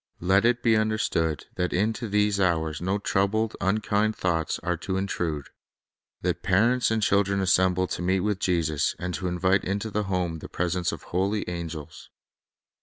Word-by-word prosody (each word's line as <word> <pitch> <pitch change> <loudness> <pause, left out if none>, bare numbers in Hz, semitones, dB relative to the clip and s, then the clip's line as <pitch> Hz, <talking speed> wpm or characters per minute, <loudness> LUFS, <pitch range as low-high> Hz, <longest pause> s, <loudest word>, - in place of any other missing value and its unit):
Let 95 +4 +3
it 120 0 +2
be 115 -2 +4
understood 110 -8 0
that 90 -1 -1
into 110 +4 0
these 105 0 +2
hours 80 -4 0
no 95 +3 0
troubled, 105 +2 0
unkind 105 +2 +1
thoughts 85 -3 -1
are - - 0
to 95 - -3
intrude; 85 -6 -2 0.7
that - - -1
parents 115 +7 +3
and 110 -1 0
chil 100 0 +4
dren 100 0 -1
assemble 95 -1 +3
to - - -3
meet 95 +1 +1
with 105 0 -1
Jesus, 80 -6 0
and 90 0 -4
to 90 +4 -3
invite 95 +2 +2
into 100 +3 -2
the 105 0 -1
home 90 -4 -1
the - - -9
presence 90 0 -1
of - - -7
holy 100 +4 -1
angels. 85 -4 -6
95 Hz, 170 wpm, -26 LUFS, 90-105 Hz, 0.7 s, be